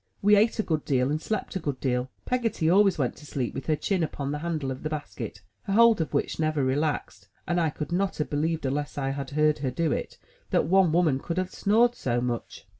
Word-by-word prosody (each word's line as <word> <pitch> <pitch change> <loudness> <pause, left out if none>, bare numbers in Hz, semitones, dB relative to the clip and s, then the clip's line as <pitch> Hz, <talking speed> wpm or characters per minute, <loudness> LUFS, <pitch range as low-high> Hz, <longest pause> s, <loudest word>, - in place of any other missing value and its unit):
We 210 +1 +6
ate 215 +3 +3
a 220 - +1
good 155 -5 -1
deal, 130 0 +1
and 155 +1 -1
slept 215 0 -3
a - - 0
good 145 -5 -3
deal. 125 -1 -1 0.2
Peggotty 235 -10 0
always 195 0 +5
went 130 -5 -1
to 150 - -13
sleep 130 -5 -3
with 135 - -6
her 155 - +3
chin 190 +4 -1
upon 145 -3 -2
the 150 - -3
handle 155 -4 -2
of 130 - -6
the 155 - -3
basket, 120 -9 -6 0.2
her 195 - -2
hold 230 -3 +6
of 160 - -3
which - - -1
never 155 -2 +1
relaxed, 130 -7 -1 0.2
and 175 0 +1
I 160 - +2
could 150 +2 -6
not 190 +2 0
have 150 - -1
believed 155 +1 -1
unless 145 +3 -2
I 135 -1 -1
had 135 -1 -4
heard 150 +1 +2
her 135 -2 -1
do 155 +5 0
it, - - -3 0.3
that - - +2
one 185 0 +4
woman 160 -5 +3
could 170 +5 -4
have 185 0 -2
snored 230 +4 +3
so 120 - -1
much. 120 -1 -4
155 Hz, 240 wpm, -27 LUFS, 135-180 Hz, 0.3 s, We